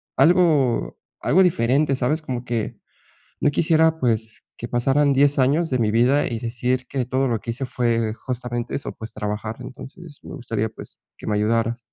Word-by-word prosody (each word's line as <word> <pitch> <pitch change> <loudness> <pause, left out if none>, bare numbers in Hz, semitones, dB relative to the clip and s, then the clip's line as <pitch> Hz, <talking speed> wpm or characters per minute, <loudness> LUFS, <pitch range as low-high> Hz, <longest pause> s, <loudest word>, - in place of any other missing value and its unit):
algo 160 -8 +3 0.2
algo 190 +1 +4
diferente, 140 -2 +2
¿sabes? 145 +5 0
Como 125 -4 -5
que 115 -3 -3 0.6
no 145 - +2
quisiera, 160 +1 +3
pues, 115 -2 -1
que 120 - -6
pasaran 135 +4 +2
10 140 +1 +3
años 150 +6 +2
de 130 - +1
mi 105 -2 +2
vida, 125 +6 +3
y 115 -2 -3
decir 125 +2 -2
que 130 -3 -2
todo 130 +1 0
lo 115 -2 0
que 115 +4 -5
hice 130 +3 -4
fue 115 -3 0
justamente 120 0 -4
eso, 140 - -4
pues, 110 0 -9
trabajar. 105 +1 -4
Entonces 145 +4 -11
me - - -9
gustaría 115 -5 -2
pues, 110 - -11 0.2
que - - -10
me 105 - +1
ayudaras. 115 +3 +1
125 Hz, 175 wpm, -22 LUFS, 115-140 Hz, 0.6 s, algo